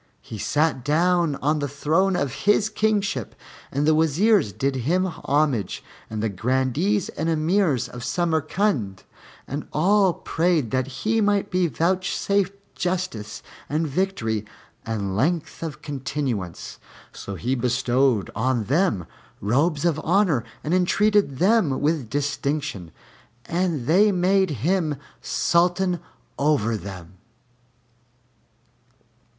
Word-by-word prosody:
He 110 - -8
sat 150 -1 +1
down 165 +1 +2
on 150 +2 +2
the 145 - -1
throne 160 +7 +1
of 140 -7 -1 0.2
his 210 +1 +4
kingship, 205 - -1 0.4
and 140 +2 0
the 155 - +4
Wazirs 160 - +3
did 130 +7 -1
him 170 +10 +1
homage 145 - -1 0.3
and 110 0 -4
the - - +2
Grandees 130 - 0
and 160 +2 -2
Emirs 160 - +1
of 120 -1 -9
Samarcand, 155 - 0 0.4
and 145 +3 -5
all 190 +3 +3
prayed 165 -7 0
that 130 0 0
he 220 - -1
might 205 -1 +1
be 180 -1 +2
vouchsafed 190 +4 0 0.2
justice 175 - -3 0.3
and 155 +3 0
victory 135 - -1 0.4
and 100 -4 -2
length 160 - -1
of 160 -3 -6
continuance. 135 - -4 0.3
So 100 - -7
he 120 +8 -2
bestowed 125 -2 +1
on 120 +1 0
them 130 - +1 0.3
robes 145 - +1
of 160 -3 +1
honor 175 - +2 0.2
and 155 - -1
entreated 195 -3 +2
them 185 - +3
with 145 -6 0
distinction, 140 - -2 0.6
and 170 -7 -1
they 200 - +5
made 190 +1 +2 0.2
him 170 -4 +1 0.3
Sultan 180 +1 +1 0.4
over 140 -6 +2
them. 95 -3 -9
155 Hz, 115 wpm, -23 LUFS, 130-180 Hz, 0.6 s, they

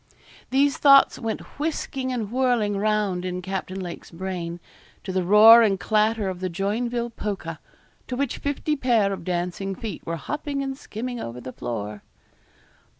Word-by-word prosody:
These 275 +2 +3
thoughts 275 -1 +6
went 225 -3 -3 0.2
whisking 275 -4 -2
and 225 -5 -3
whirling 245 -5 +1
round 205 -3 0
in 180 0 -3
Captain 190 0 -4
Lake's 175 -2 -7
brain, 175 -1 -5 0.4
to 190 - -4
the 185 0 0
roar 215 +5 +9
and 200 -4 +2
clatter 215 +2 +1
of 185 -2 -4
the 185 0 -2
Joinville 235 +6 -2
Polka, 195 -7 -4 0.5
to 250 - -3
which 275 -1 -2
fifty 290 +2 -1
pair 230 -7 +2
of 190 - -6
dancing 180 +2 -2
feet 220 +2 -6
were 165 - -3
hopping 290 - -3
and 270 0 -3
skimming 245 -1 -6
over 115 - -6
the 130 +1 -8
floor. 105 -3 -5
210 Hz, 155 wpm, -24 LUFS, 185-245 Hz, 0.5 s, roar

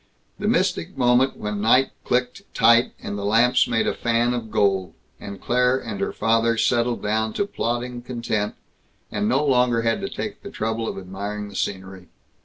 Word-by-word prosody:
The - - -2
mystic 80 - 0
moment 125 +1 +3
when 105 -1 -4
night 125 +5 +4
clicked 125 +7 0
tight, 115 +1 +5
and 100 - -4
the - - -5
lamps 115 +5 +3
made 115 - +1
a - - 0
fan 120 +1 +1
of 120 -3 -4
gold, 95 -5 +1 0.2
and 100 -1 -8
Claire 125 +1 +2
and 110 -6 -6
her - - -1
father 115 0 +1
settled 120 +1 +1
down 110 +1 0
to 205 - 0
plodding 120 - -3
content 115 -4 -3 0.6
and 105 - -1
no 135 +5 +2
longer 125 -4 +2
had 115 +11 0
to 195 - -3
take 215 - -6
the - - -8
trouble 110 - -3
of - - -4
admiring 100 +2 -6
the 100 - -13
scenery! 95 -2 -4
115 Hz, 180 wpm, -23 LUFS, 105-125 Hz, 0.6 s, tight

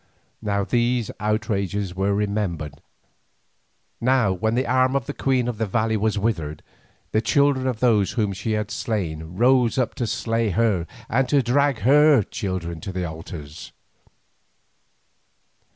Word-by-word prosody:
Now 100 -1 0
these 120 +1 0
outrages 100 -3 -1
were 100 +2 0
remembered, 100 -8 -2 1.2
now 125 -5 +3
when 110 +5 -1
the 130 +2 +1
arm 130 +2 +2
of 135 -4 0
the - - -5
queen 130 -3 0
of 120 -3 -4
the 110 - 0
valley 110 +2 0
was 110 0 0
withered, 85 -9 -2 0.5
the 110 - +2
children 140 +2 +2
of 125 -4 -2
those 110 -6 +3
whom 105 -5 0
she 100 +4 -3
had 105 -1 -2
slain 85 -6 -3
rose 125 +2 +3
up 130 -3 0
to 120 - 0
slay 115 +1 0
her 100 -3 +1 0.2
and 130 +3 +1
to 140 -2 +3
drag 140 +1 +2
her 145 +1 +5
children 90 -5 -4
to 95 - -5
their 90 -1 -3
altars. 80 -1 -9
110 Hz, 145 wpm, -23 LUFS, 95-125 Hz, 1.2 s, her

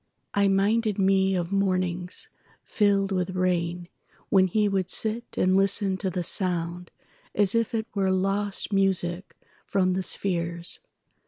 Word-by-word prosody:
I 200 0 +3
minded 205 +2 +1
me 195 0 +2
of 175 0 -2
mornings 185 -2 +1 0.4
filled 200 -2 +1
with 185 -1 -2
rainWhen 180 +1 -1
he 210 +3 +1
would 190 -2 -1
sit 225 +4 +1
and 185 +1 +2
listen 195 0 +2
to 190 - -2
the 180 -1 -3
soundAs 180 +2 -1
if 230 +1 0
it 220 -1 -1
were 195 -2 0
lost 195 +2 -1
music 190 -2 +1 0.3
from 185 -2 +1
the 190 - -1
spheres. 170 -2 -1
190 Hz, 130 wpm, -26 LUFS, 180-200 Hz, 0.4 s, I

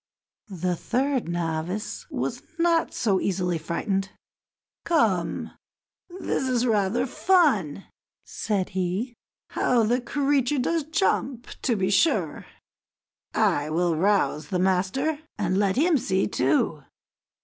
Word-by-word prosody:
The 180 -2 -2
third 260 +2 -1
novice 170 +4 -3
was - - -3 0.2
not 335 -1 +2
so 200 -5 +1
easily 180 -3 -1
frightened. 190 +4 -2 0.7
"Come, 220 - +1 0.7
this 265 -7 -1
is 250 -1 +1
rather 220 +1 +1
fun," 260 - +2 0.4
said 200 -4 -2
he; 190 +7 -2 0.4
"how 240 -2 +2
the 240 +4 +1
creature 280 +2 +1
does 320 +4 0
jump, 280 -6 0 0.2
to 245 - +1
be 190 -1 0
sure! 195 - +1 0.9
I 145 +1 +2
will 170 +1 +1
rouse 170 -4 +1
the 180 - -1
master, 190 - +1 0.2
and 190 -2 0
let 195 -2 +2
him 310 +2 +3
see, 190 -3 0
too." 145 +2 +1
205 Hz, 115 wpm, -25 LUFS, 180-265 Hz, 0.9 s, him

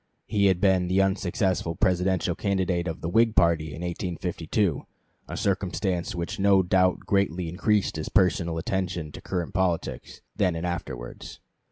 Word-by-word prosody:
He 100 -1 +2
had 95 -2 +2
been 95 -2 +3
the 95 +2 +2
unsuccessful 95 -3 0
Presidential 90 0 +1
candidate 95 -2 -1
of 80 - -5
the - - -3
Whig 115 +4 +3
party 85 -2 +3
in 80 +3 -7
1852, 90 0 -2 0.4
a - - -6
circumstance 95 -2 -1
which 85 +2 -4
no 100 -1 +5
doubt 90 0 +2
greatly 90 -3 0
increased 100 +2 0
his 80 - -4
personal 90 -4 +2
attention 90 -3 -2
to - - -10
current 90 -3 -3
politics, 90 -3 -2
then 95 -5 +1
and 80 +1 -3
afterwards. 65 -9 -6
90 Hz, 150 wpm, -26 LUFS, 85-95 Hz, 0.4 s, no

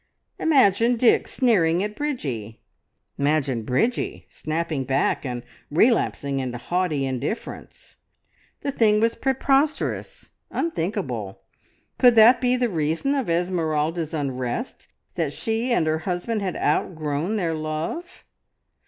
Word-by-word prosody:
Imagine 245 -6 +4
Dick 235 0 +3
sneering 185 -9 +2
at 210 0 -4
Bridgie! 135 - -4 0.6
Imagine 140 -4 +1
Bridgie 130 - -1
snapping 155 -3 -2
back 135 +1 0
and 120 -1 -4 0.3
relapsing 145 - +2
into 125 -2 -3
haughty 160 0 -1
indifference! 130 - -5 0.6
The 280 - -2
thing 215 -5 +3
was 230 +1 +2
preposterous, 270 +3 0 0.2
unthinkable! 160 - -3 0.6
Could 245 -2 +6
that 230 +3 +7
be 250 0 +3
the 250 -1 +1
reason 165 - 0
of 270 -9 -1
Esmeralda's 165 -2 0
unrest, 140 - -4 0.3
that - - -2
she 230 +2 -2
and 205 -9 +2
her 155 0 0
husband 195 +5 -2
had 185 -3 -2
outgrown 155 +3 -1
their 170 -6 0
love? 160 - -5
175 Hz, 115 wpm, -24 LUFS, 150-235 Hz, 0.6 s, that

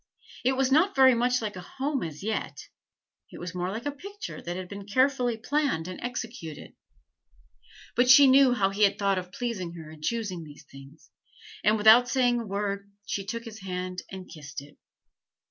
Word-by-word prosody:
It 260 +2 +3
was 265 0 +1
not 335 +8 +4
very 260 -1 +7
much 245 +1 +1
like 210 -2 -4
a 180 - -7
home 270 - -3
as 155 +1 -6
yet; 220 +1 -3 0.7
it - - -10
was 175 0 -6
more 180 0 -2
like 225 +6 -5
a 290 - 0
picture 400 +9 -8
that 175 +1 -5
had 185 -1 -6
been 200 +1 -9
carefully 250 +1 +2
planned 265 - -1
and 185 - -7
executed; 230 - -6 1.2
but 245 +1 +3
she 275 +2 +9
knew 265 -1 +6
how 195 -4 +1
he 200 +2 -4
had 200 -2 +4
thought 195 -2 +1
of 180 0 -9
pleasing 195 -7 -4
her 160 -2 -10
in 155 -1 -13
choosing 200 -3 -2
these 150 0 -13
things, 135 +3 -15 0.5
and 215 +1 +4
without 220 +4 +7
saying 245 -2 +2
a 230 - -6
word 200 0 -3
she 200 - -3
took 230 +4 -5
his 220 -1 -9
hand 185 -1 -4
and 190 -1 -8
kissed 145 -2 -9
it. 145 +1 -15
210 Hz, 190 wpm, -27 LUFS, 180-250 Hz, 1.2 s, she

